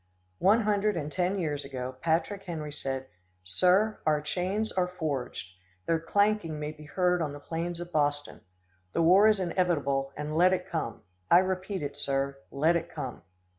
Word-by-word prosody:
One 205 +5 +5
hundred 210 -2 +1
and 150 -2 -3
ten 185 +4 0
years 150 -5 -2
ago, 130 -1 -5
Patrick 170 +5 0
Henry 155 -4 -5
said: 135 -2 -3 0.4
"Sir, 185 - +3
our 150 -1 +3
chains 185 +8 -2
are 180 -1 +1
forged. 140 - -4 0.3
Their 165 -1 +2
clanking 200 -2 +1
may 150 0 -3
be 155 0 -13
heard 180 +2 +1
on 150 -3 -2
the 145 - -8
plains 170 +3 -4
of 175 0 -7
Boston. 145 -2 0 0.5
The 165 - +2
war 190 +6 +7
is 215 -2 +4
inevitable, 155 -7 0
and 150 +1 -4
let 180 +3 +5
it 185 - -2
come. - - -4 0.3
I 170 - +8
repeat 185 0 0
it, 140 0 -4
sir, 140 -1 -1
let 155 +5 +2
it 170 0 -1
come!" 135 -6 -6
165 Hz, 170 wpm, -29 LUFS, 145-185 Hz, 0.5 s, I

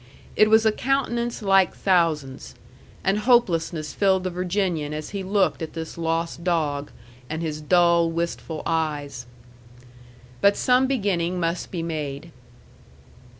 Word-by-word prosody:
It 215 - +5
was 220 +1 +5
a 220 - +5
countenance 240 -2 -1
like 195 -2 +3
thousands; 160 -8 0 0.5
and 195 +2 +1
hopelessness 175 -10 +1
filled 190 -2 +2
the 185 - -2
Virginian 175 -4 -1
as 155 0 -6
he 200 -1 -4
looked 190 -1 +1
at 160 - -5
this 160 -1 -6
lost 165 0 -2
dog, 150 -5 -1 0.4
and 160 +2 -3
his 155 -1 -4
dull, 170 +1 +3
wistful 165 -1 -4
eyes. 150 -6 -2 1.1
But 200 0 +4
some 255 +1 +3
beginning 185 -8 0
must 170 +1 -2
be 170 -3 -4
made. 155 -1 -5
170 Hz, 130 wpm, -24 LUFS, 160-195 Hz, 1.1 s, It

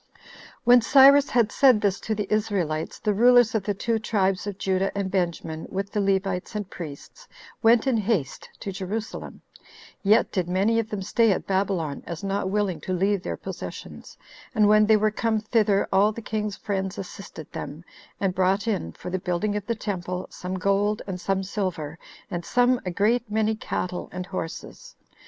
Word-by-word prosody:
3. - - -26 0.4
When 245 +1 +7
Cyrus 275 +3 +7
had 235 -3 +2
said 260 -6 +5
this 200 -2 0
to 220 - -2
the 210 -1 -2
Israelites, 190 -8 -1
the 210 - 0
rulers 245 +2 +5
of 220 - +1
the 205 0 -1
two 225 +3 -1
tribes 195 -3 0
of 200 -2 -4
Judah 190 -1 0
and 195 -2 -2
Benjamin, 170 -4 -2
with 195 +1 -4
the 210 - 0
Levites 195 -1 -1
and 205 -2 -3
priests, 175 - -10 0.3
went 230 0 +5
in 260 -4 +2
haste 200 - -1
to 195 - -4
Jerusalem; 200 +3 -5 0.6
yet 210 +3 +3
did 180 -3 -1
many 200 +5 +2
of 225 -1 -3
them 205 -3 -4
stay 225 +2 +3
at 190 - -1
Babylon, 190 -6 -1
as 170 +1 -6
not 195 -1 -1
willing 195 -5 -1
to 185 - -3
leave 195 +2 +1
their - - -4
possessions; - - -8 0.4
and 210 -2 +5
when 215 0 +5
they 220 0 +6
were 215 0 +2
come 220 0 0
thither, 215 -2 +2
all 200 +3 +4
the 220 - -7
king's 210 -2 -3
friends 195 -2 -3
assisted 185 -5 -9
them, 150 +4 -7 0.4
and 195 -2 0
brought 190 +4 +1
in, 190 - -1
for 180 - -8
the 185 - -1
building 180 +4 -1
of 210 -1 -4
the 230 - 0
temple, 185 -4 -4
some 185 +1 -5
gold, 200 +2 +1
and 180 -2 -5
some 195 +1 0
silver, 180 -6 -4 0.3
and 175 -2 -3
some 245 +5 +2
a - - +1
great 215 +6 +1
many 220 +1 +1
cattle 180 -4 -4
and 180 - -5
horses. 190 - -7
200 Hz, 185 wpm, -25 LUFS, 185-220 Hz, 0.6 s, When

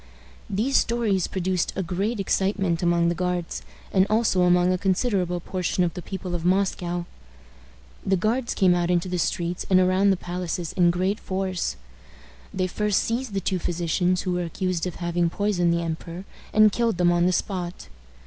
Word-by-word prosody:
These 220 +8 +1
stories 220 -6 +1
produced 185 -1 -1
a 190 - -1
great 195 +6 -2
excitement 195 -3 0
among 170 -1 +2
the - - +1
Guards, 175 - -2 0.3
and 190 +1 +4
also 215 -4 +2
among 180 0 +4
a - - 0
considerable 190 -2 0
portion 180 +1 -1
of 170 - 0
the 180 - -6
people 185 0 -6
of 170 -2 -2
Moscow. 180 -2 0 1.0
The 190 0 +2
guards 230 +6 0
came 185 -2 +4
out 175 0 0
into 175 0 +1
the 180 -1 -2
streets 170 +1 -1
and 185 -1 +5
around 185 +2 +3
the 190 - +3
palaces 175 -1 -4
in 175 -2 +4
great 185 +4 0
force. 185 - -2 0.8
They 185 -1 -1
first 210 +2 0
seized 230 -2 -2
the 195 - 0
two 185 0 -1
physicians 175 +2 0
who 185 - -2
were 180 0 -1
accused 180 +1 -2
of 180 - -6
having 175 -1 0
poisoned 180 -2 +1
the 170 0 0
emperor, 170 +2 -5 0.3
and 215 0 +6
killed 230 -3 0
them 175 0 +4
on 175 0 +3
the - - +3
spot. 180 - -3
180 Hz, 175 wpm, -24 LUFS, 175-195 Hz, 1.0 s, and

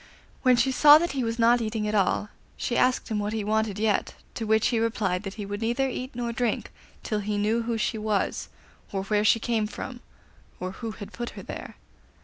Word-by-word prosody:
When 255 -2 +5
she 250 +3 +2
saw 295 +3 +8
that 345 +2 0
he 270 -2 -1
was 230 0 -2
not 235 +1 +4
eating 215 -1 -2
at 210 - -1
all, 205 0 +1 0.3
she 240 - -2
asked 250 +1 +2
him 215 -2 -1
what 205 +1 -2
he 220 -2 -1
wanted 215 -1 0
yet, 210 -1 0 0.2
to 225 - -4
which 220 0 +3
he 235 -2 +1
replied 215 -5 0
that 195 -2 -7
he 210 - -5
would 205 +2 -5
neither 240 +4 +1
eat 255 0 -5
nor 240 -1 -2
drink 235 -1 -1 0.3
until 215 -3 -1
he 205 0 -2
knew 215 +3 +1
who 230 0 -2
she 220 +1 -1
was, 210 -2 -1 0.4
or 195 -1 -2
where 210 +1 +1
she 220 +2 +4
came 225 -2 0
from, 245 +3 -7 0.6
or 185 0 -3
who 225 +4 -6
had 205 -2 -9
put 240 0 -4
her - - -7
there. - - -7
220 Hz, 220 wpm, -26 LUFS, 210-240 Hz, 0.6 s, saw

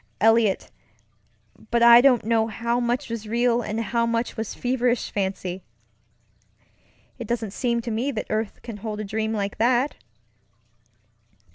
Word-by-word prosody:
Eliot, 225 -2 +3 1.0
but 235 0 +2
I 235 0 +9
don't 250 -5 +4
know 225 -1 +2
how 235 +2 -1
much 245 +3 -1
was 230 -2 -5
real 240 +1 +2
and 215 0 -3
how 230 +1 0
much 230 +1 -1
was 220 -2 -5
feverish 245 -1 0
fancy. 190 -2 -3 1.6
It 235 - -6
doesn't 225 -3 -2
seem 235 +2 -1
to 230 - -5
me 235 +6 -1
that 225 -6 -3
earth 215 -1 -3
can 230 -3 -7
hold 210 0 -5
a - - -3
dream 220 +2 -2
like 200 -2 -3
that! 250 +4 +2
230 Hz, 145 wpm, -24 LUFS, 215-240 Hz, 1.6 s, I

